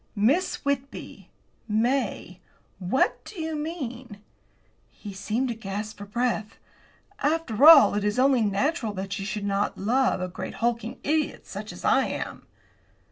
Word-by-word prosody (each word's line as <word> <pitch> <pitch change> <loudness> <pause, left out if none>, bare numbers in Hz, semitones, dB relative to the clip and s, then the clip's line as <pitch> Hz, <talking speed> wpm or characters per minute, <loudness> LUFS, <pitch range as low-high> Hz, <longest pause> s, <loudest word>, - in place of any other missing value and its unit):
"Miss 280 - +1
Whitby! 280 -1 -4 0.4
May! 220 -4 -1 0.4
What 260 - +1
do 400 - -10
you 320 0 -3
mean?" 260 - -5 0.7
He 205 -2 -10
seemed 215 +7 -2
to - - -1
gasp 210 0 -6
for 205 - -7
breath. 220 -1 -2 0.6
"After 295 -4 +2
all, 320 -4 +9
it 205 0 -1
is 210 +3 0
only 260 -1 +4
natural 220 +3 0
that 195 +1 -4
you 195 - -4
should 210 0 -3
not 200 0 -1
love 250 +5 +1
a 185 - -2
great 180 - -7
hulking 235 0 -1
idiot 310 +1 -1
such - - -7
as - - -9
I - - +4
am." - - -6
235 Hz, 145 wpm, -26 LUFS, 205-280 Hz, 0.7 s, all